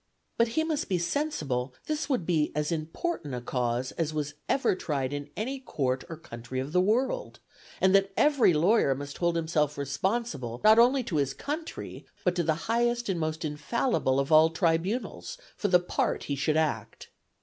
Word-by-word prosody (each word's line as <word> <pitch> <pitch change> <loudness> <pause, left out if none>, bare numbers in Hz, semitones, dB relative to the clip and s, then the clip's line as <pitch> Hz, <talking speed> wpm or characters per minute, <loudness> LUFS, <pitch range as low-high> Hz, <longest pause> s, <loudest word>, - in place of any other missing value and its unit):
But 230 - +3
he 315 - +4
must 315 -2 -2
be 185 - +2
sensible 150 - -2
this 305 0 -2
would 250 - 0
be 160 -4 +1
as 150 +1 -1
important 160 - -3
a - - -3
cause 125 0 -1
as 155 -2 -2
was 150 -1 -2 0.2
ever 270 - +2
tried 140 -6 -2
in 145 0 -5
any 265 +6 -3
court 130 - -2
or 165 - -6
country 120 -5 -7
of 135 +3 -4
the 180 - +4
world; 250 - 0 0.4
and 190 0 +4
that 195 0 +4
every 285 -9 +5
lawyer 165 -2 +3
must 140 +1 -7
hold 170 -1 +1
himself 160 -3 0
responsible 140 - -2
not 220 +1 +7
only 255 +2 +5
to 170 -8 -2
his 135 -1 0
country, 315 +3 -6 0.2
but 180 - +3
to 180 - 0
the 160 -2 +1
highest 240 0 +1
and 180 -3 0
most 155 +1 -2
infallible 150 - 0
of 140 +3 -1
all 155 +1 +7
tribunals, 170 - -1 0.2
for 205 - -1
the 180 -2 +5
part 175 - -1
he 140 - -2
should 150 +3 +1
act. 160 -1 -2
165 Hz, 185 wpm, -28 LUFS, 145-230 Hz, 0.4 s, not